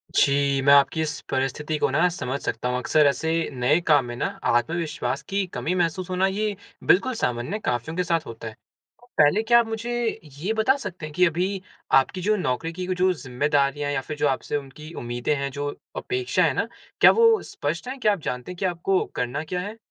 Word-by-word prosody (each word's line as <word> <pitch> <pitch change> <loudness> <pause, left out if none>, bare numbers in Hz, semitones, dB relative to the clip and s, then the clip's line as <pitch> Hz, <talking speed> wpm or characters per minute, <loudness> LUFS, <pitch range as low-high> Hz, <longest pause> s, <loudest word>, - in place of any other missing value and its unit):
जी, 140 -1 +3
मैं 140 +1 +6
आपकी 140 +3 +4
इस 150 -2 -2
परिस्थिति 135 +4 -1
को - - +1
ना 165 +6 +3
समझ 140 -6 -4
सकता 125 +2 -2
हूँ। 125 - 0
अक्सर 150 +4 +3
ऐसे 160 +3 0 0.2
नए 130 +6 +2
काम 145 -5 +5
में 120 0 -6
ना - - -2 0.2
आत्मविश्वास 160 +7 0
की 195 0 0
कमी 175 - -1
महसूस 175 +1 -1
होना 185 +1 +2
ये 205 +1 -1 0.3
बिल्कुल 255 +8 +3
सामान्य 125 - -2
है, 215 - -2
काफ़ियों 125 - -2
के 180 - +2
साथ 165 -2 0
होता 115 0 -8
है। 110 - -7 0.5
तो 245 - -21
पहले 170 +10 +4
क्या 235 +1 +6
आप 230 - +1
मुझे 235 +1 -2 0.3
ये 190 +9 -1
बता 225 +5 +3
सकते 175 - -7
हैं 150 - -9
कि 180 - +5
अभी 185 +3 -1 0.4
आपकी 180 +7 -3
जो 210 +3 +2
नौकरी 165 -2 -2
की 180 +1 -5
वो 185 - 0
जो 185 +1 +2
ज़िम्मेदारियाँ 145 0 0
या 135 -2 -1
फिर 150 +2 -7
जो 145 0 +2
आपसे 135 +2 -1
उनकी 150 +4 -10
उम्मीदें 120 +4 -2
हैं, 140 -1 -3
जो 145 +1 -3 0.3
अपेक्षा 385 -1 0
है - - +3
ना, - - -1 0.3
क्या - - +9
वो 455 -1 +5
स्पष्ट 165 +9 -4
है? 265 +2 -5
क्या 215 -5 +3
आप 195 - -4
जानते 125 +8 -5
हैं 180 - -9
कि 190 - -2
आपको 180 +2 +1
करना 125 +5 -2
क्या 180 +3 -3
है? 210 +4 -6
160 Hz, 215 wpm, -24 LUFS, 140-190 Hz, 0.5 s, क्या